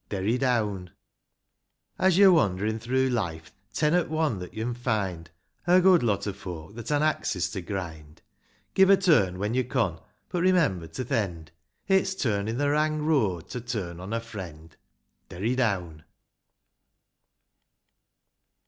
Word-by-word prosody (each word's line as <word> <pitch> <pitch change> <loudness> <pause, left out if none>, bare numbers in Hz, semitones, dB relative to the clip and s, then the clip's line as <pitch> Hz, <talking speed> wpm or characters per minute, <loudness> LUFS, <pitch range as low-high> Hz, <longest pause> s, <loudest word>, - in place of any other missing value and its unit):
Derry 100 +3 0
down. 105 -8 0
X. - - -25 1.1
As 185 -2 +3
yo 195 -2 +8
wander'n 105 - +1
through 130 +2 +1
life, 85 -10 -3 0.2
ten 150 0 +1
'at 175 -1 +2
one 155 -9 0
that 90 - -8
yo'n 115 +3 -2
find 100 -9 -2 0.4
A 180 +1 +6
good 185 -2 +5
lot 105 -5 0
o' 100 - -2
folk 90 -3 -8
that 115 0 -8
han 150 0 +2
axes 105 - 0
to 95 - -4
grind; 80 -5 -7 0.5
Give 190 0 +5
a 195 - +7
turn 150 - +3
when 105 +4 -2
yo 130 - +2
con; - - -1 0.3
but 175 - -2
remember 165 - +2
to 105 +11 -5
th' 125 - -15
end. 85 - -2 0.4
It's 190 0 +2
turnin' 110 - -1
th' - - -2
wrang 150 +1 +1
road 105 - +1
to 125 - -5
turn 100 -8 -5
on 95 +3 -7
a 115 - 0
friend. 90 -9 -9 0.5
Derry 105 +8 -2
down. 90 -11 -1
110 Hz, 150 wpm, -26 LUFS, 90-150 Hz, 1.1 s, yo